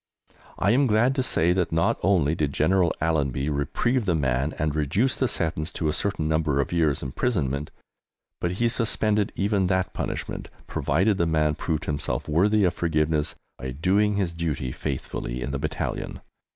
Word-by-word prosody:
I 100 - +2
am 135 +3 +4
glad 115 +4 +3
to 135 - 0
say 90 -8 +2
that 90 -2 0
not 80 0 +1
only 85 -6 +3
did 75 -4 -1
General 90 +3 +3
Allenby 70 -3 0
reprieve 80 - 0
the 85 - +3
man 70 0 0
and 75 -1 0
reduce 80 - +1
the 130 - 0
sentence 80 -4 -1
to 80 - -1
a - - 0
certain 90 -5 -1
number 80 -3 +1
of 70 - 0
years' 80 -5 +1
imprisonment, 70 - -1 0.7
but 85 0 -1
he 115 +6 +1
suspended 110 -3 +1
even 100 -1 +1
that 95 0 0
punishment, - - -4 0.2
provided 95 +8 +1
the 85 - +2
man 75 -2 +2
proved 75 0 -2
himself 75 -1 -2
worthy 100 +6 +3
of 90 - +2
forgiveness 80 0 0 0.2
by 65 +1 -4
doing 95 +10 +2
his 95 -4 -1
duty 75 -6 -2
faithfully 65 -3 -4
in 65 +2 -3
the 70 - -2
battalion. - - -3
80 Hz, 170 wpm, -25 LUFS, 75-100 Hz, 0.7 s, am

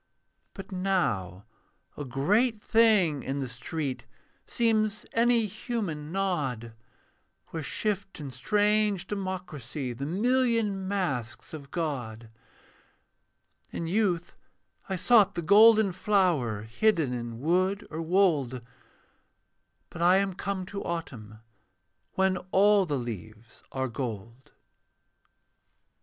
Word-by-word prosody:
But 195 -1 -9
now 145 - -1 0.5
a 145 - -5
great 205 - +1
thing 210 - +3
in 135 +2 -3
the 135 - -3
street 130 +4 -5 0.4
Seems 220 -3 +1
any 235 0 +3
human 185 -8 -4
nod, 145 - -2 0.8
Where 165 - -5
shift 200 +4 -2
in 140 -3 -6
strange 205 - +1
democracy 180 - -5
The 135 +4 -5
million 225 0 +1
masks 140 - -3
of 140 -3 -8
God. 120 -10 -4 1.4
In 170 - -5
youth 180 -2 0 0.6
I 190 - -1
sought 210 +2 +4
the 170 - -3
golden 215 +2 +6
flower 175 - +1
Hidden 155 - +1
in 120 -1 -5
wood 185 +7 +1
or 160 +1 -4
wold, 160 -9 +1 1.3
But 165 - -8
I 180 +2 +5
am 195 -1 0
come 195 0 -4
to 200 +2 -6
autumn, 115 -11 -6 0.7
When 190 -1 +2
all 200 0 +4
the 145 -3 -1
leaves 110 -2 -8
are 130 0 -2
gold. 115 0 -6
175 Hz, 105 wpm, -28 LUFS, 130-200 Hz, 1.4 s, golden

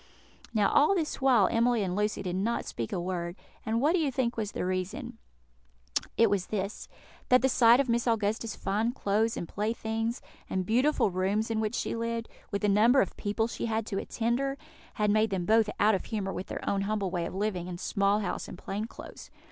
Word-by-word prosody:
Now 210 -3 +2
all 305 +7 +5
this 315 -5 -2
while 245 -8 +5
Emily 235 -1 +2
and 180 -1 -2
Lucy 210 0 -1
did 180 -1 -3
not 220 +5 -1
speak 115 -2 -5
a - - -1
word; 175 -1 -3 0.3
and 225 +1 0
what 295 +6 +3
do 365 - +3
you 295 -4 +1
think 245 -2 -1
was 215 -3 -3
the - - -2
reason? 190 +7 -3 1.0
It 230 - +6
was 200 -3 0
this: 200 0 -3 0.4
that 250 0 +5
the - - +5
sight 240 -1 +6
of 275 - +2
Miss 235 +1 +1
Augusta's 220 -1 0
fine 220 +5 -1
clothes 220 0 0
and 170 - -4
playthings, 225 +3 -2 0.3
and 185 -1 -1
beautiful 245 +1 +2
rooms 195 +5 0
in 220 - 0
which 220 +1 -1
she - - -2
lived, 230 0 -3 0.2
with 200 0 -3
the - - +3
number 220 +6 +5
of - - +1
people 210 +2 -1
she 235 - -4
had 220 -1 -1
to 195 -3 -2
attend 235 +3 -1
her, 275 0 -2 0.4
had 210 -1 +2
made 215 +1 +3
them 190 -3 -2
both 220 +1 +4
out 215 +1 +5
of 190 - -1
humour 200 -4 -3
with 185 - -5
their - - -6
own 200 -1 +1
humble 200 -2 -1
way 175 -2 -1
of - - -8
living, 190 -3 -2
and 175 -1 -6
small 200 +2 +1
house 180 -3 -3
and - - -9
plain 200 +4 -4
clothes. 230 - -11
215 Hz, 215 wpm, -29 LUFS, 195-235 Hz, 1.0 s, It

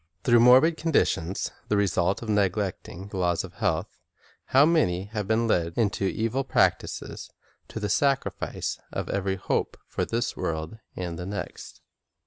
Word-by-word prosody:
Through 120 -1 +5
morbid 130 +7 +6
condi 165 -1 +3
tions, 85 +4 -3 0.2
the 105 - +1
result 95 0 +1
of - - -7
neglecting 100 -2 -1
the 100 - -6
laws 90 -2 +1
of - - -9
health, - - -1 0.5
how 135 +2 +5
many 145 - +2
have 105 -3 -2
been 115 +2 +2
led 85 -6 +1
into 100 -3 +1
evil 115 +7 0
practises, - - 0 0.4
to - - -6
the 105 - -2
sacrifice 135 +6 -1
of - - -4
every 95 -1 -1
hope 95 - -2
for - - -2
this 115 +1 -2
world 80 +6 -4 0.2
and 85 -2 -4
the 90 - -5
next! 100 +1 -7
100 Hz, 155 wpm, -26 LUFS, 90-120 Hz, 0.5 s, morbid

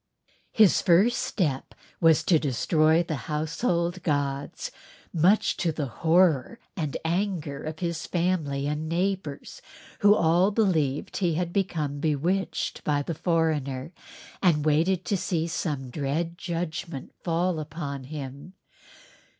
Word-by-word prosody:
His 215 -4 +5
first 195 +7 +4
step 145 -9 -2 0.2
was 165 -2 +5
to 165 -4 +4
destroy 155 +4 +2
the 160 -2 -3
household 170 +3 -1
gods, 145 -3 -2 0.4
much 180 +6 +3
to 170 - 0
the 150 -2 -3
horror 165 - +2 0.2
and 155 -6 -2
anger 170 -5 -1
of 155 0 -5
his 170 -2 -3
family 165 -6 0
and 150 +2 -2
neighbors, 180 -4 -2 0.4
who 205 +1 +6
all 175 +3 +3
believed 165 - 0
him 175 -4 +1
to - - -2
have 175 -1 -2
become 155 -7 -1
bewitched 165 +5 -1
by 145 -1 +1
the 165 - -3
foreigner 155 -5 -1 0.5
and 155 -6 +3
waited 165 +5 +2
to 205 - 0
see 165 -2 -1
some 145 -6 -3
dread 155 +5 -2
judgment 165 -4 -5
fall 170 0 0
upon 145 -3 -5
him. 140 +3 -8
160 Hz, 125 wpm, -26 LUFS, 145-180 Hz, 0.5 s, who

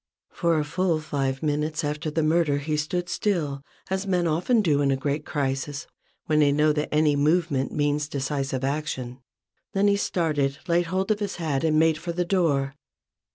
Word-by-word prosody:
For 170 -2 +1
a 150 - 0
full 170 +1 0
five 135 -3 -2
minutes 150 +1 -1
after 150 +1 -2
the 160 +1 0
murder 155 -2 +2
he 150 +2 -2
stood 175 +4 -2
still; 155 -11 -1 0.3
as 190 +1 -1
men 180 -2 +1
often 180 +9 +2
do 145 -5 +2
in 140 - +2
a 135 - +2
great 145 +2 -2
crisis 140 0 -2 0.4
when 155 -1 +2
they 145 -1 +5
know 150 +1 +3
that 150 0 -2
any 150 -1 +3
movement 150 -2 +1
means 145 0 0
decisive 135 -2 -2
action. 135 -3 -3 0.5
Then 200 +1 +3
he 200 0 +3
started, 150 -8 0
laid 170 0 +2
hold 190 +4 0
of 210 - +1
his 205 -2 -3
hat, 155 -5 -1
and 155 -1 +2
made 160 0 +3
for 170 +1 -4
the 175 +1 -1
door. 150 -7 +1
150 Hz, 185 wpm, -25 LUFS, 145-170 Hz, 0.5 s, they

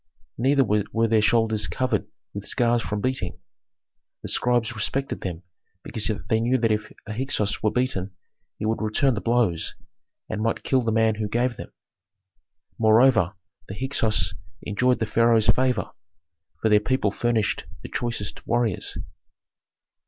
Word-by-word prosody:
Neither 135 +3 +4
were 110 +1 +1
their 110 -1 +3
shoulders 110 -1 +2
covered 125 -5 -1 0.3
with 100 0 -6
scars 120 -2 +2
from 105 -2 -3
beating; 130 -8 -2 0.9
the - - -5
scribes 120 -2 +1
respected 135 +5 -2
them 90 -1 -5 0.4
because 110 -1 -4 0.2
they 110 - +2
knew 120 +3 +2
that 115 -2 +1
if 110 0 -1
a 105 - -5
Hyksos 110 -4 -1
were 110 - +3
beaten 125 -6 -1 0.5
he 110 - -4
would 110 +1 0
return 110 +5 +2
the 105 - -3
blows, 115 -9 +1 0.5
and 105 - -3
might 115 +1 -1
kill 130 -1 +2
the 115 -2 0
man 110 0 +3
who 105 0 -3
gave 120 +3 0
them. - - -9 1.1
Moreover 110 -3 +5 0.3
the 100 - -6
Hyksos 110 - 0 0.3
enjoyed 125 +5 +2
the 110 - -1
pharaoh's 115 0 +3
favor, 125 -2 +2 0.7
for 110 - +4
their 105 0 +6
people 105 -2 0
furnished 115 -5 0 0.2
the - - -7
choicest 115 -4 -4
warriors. 120 -5 0
115 Hz, 145 wpm, -25 LUFS, 105-120 Hz, 1.1 s, their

